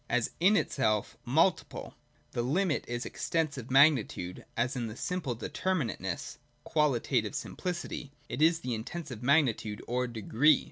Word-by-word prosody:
As 115 -1 +1
in 195 +5 +5
itself 110 -6 0
multiple, 160 +9 +1 0.4
the 120 - -1
limit 155 +6 +1
is 120 0 -3
Extensive 155 -8 -2
magnitude; 130 - +3
as 125 +3 +1
in 120 -2 -2
itself 110 +1 -6
simple 180 -9 -2
deter 185 +10 -1
minateness 125 - -3 0.3
(qualitative 130 -7 +1
simpHcity), 170 -5 -4 0.2
it 135 - -4
is 165 +1 +4
Intensive 125 +2 -4
mag 140 +5 +5
nitude 110 -3 -3
or 125 +1 0
Degree. 120 +6 +3
130 Hz, 135 wpm, -30 LUFS, 115-160 Hz, 0.4 s, in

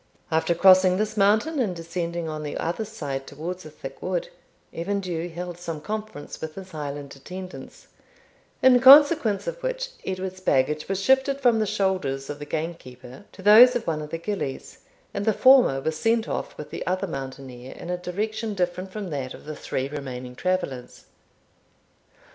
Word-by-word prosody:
After 160 +2 +2
crossing 185 0 +6
this 215 +1 -1
mountain 215 +10 +2
and 205 -8 0
descending 170 0 -4
on 155 -1 -4
the 150 -1 -4
other 175 +7 -2
side 140 -11 -5
towards 170 +4 -6
a - - -9
thick 135 -3 -10
wood, 180 -2 -2 0.4
Evan 200 +5 -2
Dhu 175 -3 -4
held 175 +1 -6
some 165 -3 -5
conference 210 -3 -6
with 160 -1 -6
his 190 -1 -9
Highland 145 -2 -6
attendants, 180 +7 -9 0.8
in 255 -1 +7
consequence 270 -5 +7
of - - -5
which - - -3
Edward's 185 0 -4
baggage 150 -2 +1
was 195 -1 -1
shifted 265 +5 +2
from 240 -4 +3
the 215 - +1
shoulders 185 -10 -1
of 145 - -8
the 145 - -6
gamekeeper 135 -3 -6
to 190 - -13
those 225 +5 +8
of 240 - -1
one 155 -2 -1
of 150 - -7
the 165 - -3
gillies, 170 -6 -5 0.3
and 200 - -2
the 220 0 +2
former 255 - +6
was 155 +3 -3
sent 225 0 +1
off - - -4
with - - -8
the - - -5
other 185 +2 0
mountaineer 130 -5 -7
in 175 - -7
a - - 0
direction 215 +4 -3
different 185 +1 -2
from 200 -3 -6
that 135 -3 -4
of - - -15
the 155 0 -6
three 130 -2 -3
remaining 130 -3 -7
travellers. 140 -6 -3
180 Hz, 175 wpm, -25 LUFS, 150-210 Hz, 0.8 s, those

